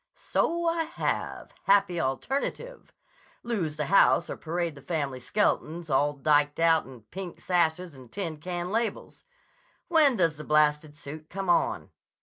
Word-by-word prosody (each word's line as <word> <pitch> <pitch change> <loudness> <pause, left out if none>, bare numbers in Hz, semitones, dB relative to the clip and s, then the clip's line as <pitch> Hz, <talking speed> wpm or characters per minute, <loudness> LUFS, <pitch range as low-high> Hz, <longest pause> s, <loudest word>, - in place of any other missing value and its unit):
"So 340 0 -1
I 330 -1 +1
have. 325 - -3
Happy 195 -3 +3
alternative! 275 - -3 0.5
Lose 190 -11 -2
the 150 -1 -2
house 175 0 +4
or - - -3
parade 170 0 -3
the 140 - -13
family 140 -4 -3
skeletons 165 0 -1
all 145 +2 +2
diked 145 +1 +2
out 165 -3 +3
in 125 -4 -13
pink 185 -1 -7
sashes 175 -1 0
and 130 -3 -14
tin 165 -6 -4
can 175 +2 -4
labels. 225 +1 -3 0.6
When 310 -6 +5
does 165 -5 +1
the 155 - -7
blasted 150 0 +2
suit 150 +2 -9
come 195 -1 -1
on?" 175 - 0
165 Hz, 145 wpm, -27 LUFS, 150-195 Hz, 0.6 s, When